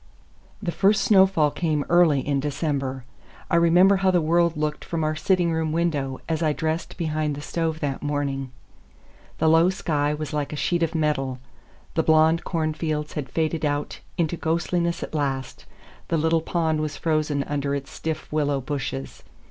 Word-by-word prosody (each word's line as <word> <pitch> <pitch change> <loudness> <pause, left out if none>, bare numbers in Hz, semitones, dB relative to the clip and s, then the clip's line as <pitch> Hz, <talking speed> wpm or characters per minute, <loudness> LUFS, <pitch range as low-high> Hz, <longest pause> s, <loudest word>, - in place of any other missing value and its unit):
IX - - -26
THE 170 - 0
first 195 +4 +3
snowfall 190 -7 +4
came 155 -4 -1
early 170 -5 +4
in 140 -1 +1
December. 140 -3 -2 0.5
I - - +3
remember 175 +4 +5
how 190 0 +2
the 180 -1 +4
world 170 0 +2
looked 150 0 -2
from 165 -2 -3
our 155 0 0
sitting 170 +2 +1
room 160 -1 -1
window 150 -5 -1
as 160 0 -1
I 155 -2 +2
dressed 160 +3 -3
behind 155 -3 -1
the - - -7
stove 160 +1 -2
that 140 -3 -2
morning: 140 -2 -2 0.9
the 160 - +1
low 165 +2 +5
sky 150 -5 0
was 150 0 -5
like 145 -1 -2
a - - -4
sheet 170 +3 0
of 165 0 0
metal; 150 -5 0 0.6
the 165 - +2
blond 160 +1 +4
cornfields 155 -2 -2
had 145 -3 -4
faded 160 0 -1
out 145 -1 -2 0.2
into 170 0 0
ghostliness 170 +1 -1
at - - -7
last; 135 -4 -3 0.4
the 165 - 0
little 160 +1 +2
pond 160 -2 0
was 150 -2 -3
frozen 155 -3 0
under 140 0 -2
its 140 -1 -6
stiff 155 -1 -4
willow 145 -2 +1
bushes. 135 0 -5
155 Hz, 170 wpm, -24 LUFS, 145-165 Hz, 0.9 s, remember